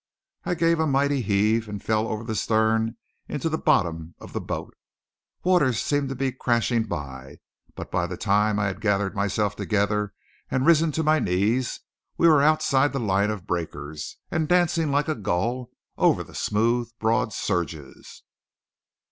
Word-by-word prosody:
I 180 Hz, -, 0 dB
gave 165 Hz, 0 st, +2 dB
a 160 Hz, -, +2 dB
mighty 140 Hz, 0 st, +2 dB
heave 110 Hz, +1 st, +1 dB
and 105 Hz, -1 st, -5 dB
fell 110 Hz, +2 st, 0 dB
over 110 Hz, 0 st, -3 dB
the 110 Hz, -1 st, -4 dB
stern 110 Hz, +2 st, +1 dB, 0.3 s
into 155 Hz, +3 st, -2 dB
the 160 Hz, -, -1 dB
bottom 80 Hz, -2 st, +1 dB
of -, -, -12 dB
the -, -, -2 dB
boat. -, -, -5 dB, 0.7 s
Waters 160 Hz, -, +3 dB
seemed 145 Hz, -2 st, 0 dB
to 135 Hz, -, -4 dB
be 135 Hz, +1 st, -1 dB
crashing 120 Hz, -2 st, 0 dB
by; 70 Hz, -6 st, -7 dB, 0.4 s
but -, -, -8 dB
by 90 Hz, -1 st, 0 dB
the 90 Hz, 0 st, -6 dB
time 105 Hz, +1 st, +2 dB
I 105 Hz, -, +1 dB
had 95 Hz, 0 st, -3 dB
gathered 100 Hz, -1 st, 0 dB
myself 100 Hz, 0 st, 0 dB
together 105 Hz, -1 st, 0 dB, 0.3 s
and 130 Hz, 0 st, 0 dB
risen 165 Hz, -1 st, +5 dB
to 160 Hz, -, 0 dB
my 155 Hz, 0 st, +3 dB
knees, 105 Hz, +7 st, 0 dB, 0.4 s
we 170 Hz, -, +5 dB
were 155 Hz, -3 st, +6 dB
outside 145 Hz, -2 st, +3 dB
the 135 Hz, -, -1 dB
line 100 Hz, -2 st, +1 dB
of 105 Hz, -4 st, -4 dB
breakers, 75 Hz, -5 st, -5 dB
and 160 Hz, -1 st, 0 dB
dancing 175 Hz, -2 st, +2 dB
like 145 Hz, +1 st, +1 dB
a 155 Hz, -, +1 dB
gull 115 Hz, +4 st, -2 dB, 0.3 s
over -, -, +3 dB
the -, -, -16 dB
smooth 115 Hz, +3 st, 0 dB
broad 115 Hz, +1 st, +1 dB
surges. 80 Hz, -7 st, -4 dB
110 Hz, 165 wpm, -25 LUFS, 100-140 Hz, 0.7 s, were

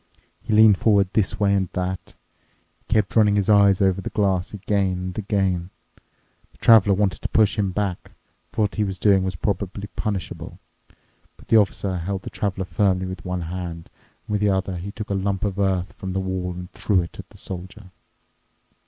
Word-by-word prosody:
He 115 Hz, -, -6 dB
leaned 110 Hz, -2 st, +6 dB
forward 100 Hz, -4 st, +3 dB
this 105 Hz, -1 st, 0 dB
way 100 Hz, -1 st, +3 dB
and 95 Hz, -3 st, +1 dB
that. 90 Hz, 0 st, -4 dB, 0.6 s
He -, -, -22 dB
kept 105 Hz, -2 st, +1 dB
running 105 Hz, -2 st, +5 dB
his 100 Hz, 0 st, +1 dB
eyes 100 Hz, -2 st, +5 dB
over 95 Hz, 0 st, +2 dB
the -, -, -5 dB
glass 95 Hz, -4 st, 0 dB
again 100 Hz, -2 st, 0 dB
and 90 Hz, +1 st, -5 dB
again. 95 Hz, -4 st, 0 dB, 0.8 s
The -, -, -23 dB
Traveler 105 Hz, -4 st, +6 dB
wanted 100 Hz, -1 st, 0 dB
to -, -, -3 dB
push 110 Hz, -2 st, +3 dB
him 105 Hz, -3 st, 0 dB
back, 95 Hz, -1 st, -3 dB, 0.4 s
for 110 Hz, -, 0 dB
what 100 Hz, -, -1 dB
he 105 Hz, -, 0 dB
was 95 Hz, -2 st, -3 dB
doing 95 Hz, -1 st, +3 dB
was 95 Hz, -2 st, -2 dB
probably 100 Hz, +2 st, -3 dB
punishable. 100 Hz, -4 st, -4 dB, 0.8 s
But -, -, -19 dB
the 115 Hz, -, +6 dB
Officer 100 Hz, -3 st, +1 dB
held 95 Hz, +3 st, -4 dB
the -, -, -7 dB
Traveler 95 Hz, -2 st, -2 dB
firmly 95 Hz, -2 st, +1 dB
with 95 Hz, 0 st, -7 dB
one 90 Hz, -1 st, -3 dB
hand, 85 Hz, -1 st, -6 dB, 0.3 s
and -, -, -5 dB
with 105 Hz, -, 0 dB
the 105 Hz, -, +3 dB
other 95 Hz, -1 st, -1 dB
he 95 Hz, +4 st, -6 dB
took 105 Hz, -1 st, -7 dB
a -, -, +1 dB
lump 95 Hz, 0 st, -1 dB
of 100 Hz, -1 st, -2 dB
earth 95 Hz, -3 st, 0 dB
from 95 Hz, -1 st, -6 dB
the 95 Hz, -, -1 dB
wall 95 Hz, -1 st, -3 dB
and 90 Hz, +1 st, -9 dB
threw 95 Hz, -3 st, +1 dB
it 85 Hz, -, -11 dB
at -, -, -9 dB
the -, -, -16 dB
Soldier. 95 Hz, +2 st, -8 dB
95 Hz, 195 wpm, -23 LUFS, 95-105 Hz, 0.8 s, leaned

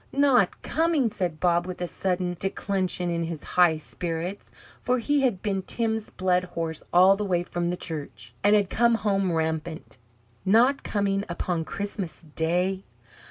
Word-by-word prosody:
"Not 270 Hz, -8 st, +3 dB
coming?" 315 Hz, -7 st, +1 dB
said 175 Hz, -6 st, -3 dB
Bob, 175 Hz, 0 st, +2 dB
with 185 Hz, -, -6 dB
a 175 Hz, -, -2 dB
sudden 180 Hz, -1 st, -2 dB
declension 190 Hz, -2 st, -1 dB
in 170 Hz, 0 st, -1 dB
his 165 Hz, -2 st, -6 dB
high 175 Hz, -3 st, +3 dB
spirits; 170 Hz, +4 st, -5 dB, 0.3 s
for 250 Hz, +1 st, +1 dB
he 285 Hz, +4 st, +1 dB
had 235 Hz, -9 st, 0 dB
been 195 Hz, -3 st, 0 dB
Tim's 220 Hz, +1 st, -2 dB
blood 180 Hz, -1 st, +1 dB
horse 165 Hz, -3 st, -4 dB
all 185 Hz, +2 st, +6 dB
the 210 Hz, -, -3 dB
way 180 Hz, -3 st, 0 dB
from 175 Hz, 0 st, -2 dB
the 180 Hz, -, -2 dB
church, 130 Hz, -, -7 dB
and 205 Hz, +1 st, +5 dB
had 200 Hz, -3 st, +1 dB
come 235 Hz, 0 st, +3 dB
home 195 Hz, -4 st, 0 dB
rampant. 160 Hz, -3 st, -3 dB, 0.4 s
"Not 235 Hz, +8 st, +4 dB
coming 200 Hz, -1 st, 0 dB
upon 170 Hz, -1 st, -2 dB
Christmas 200 Hz, -4 st, -5 dB
Day?" 180 Hz, +4 st, +1 dB
185 Hz, 160 wpm, -26 LUFS, 170-205 Hz, 0.4 s, all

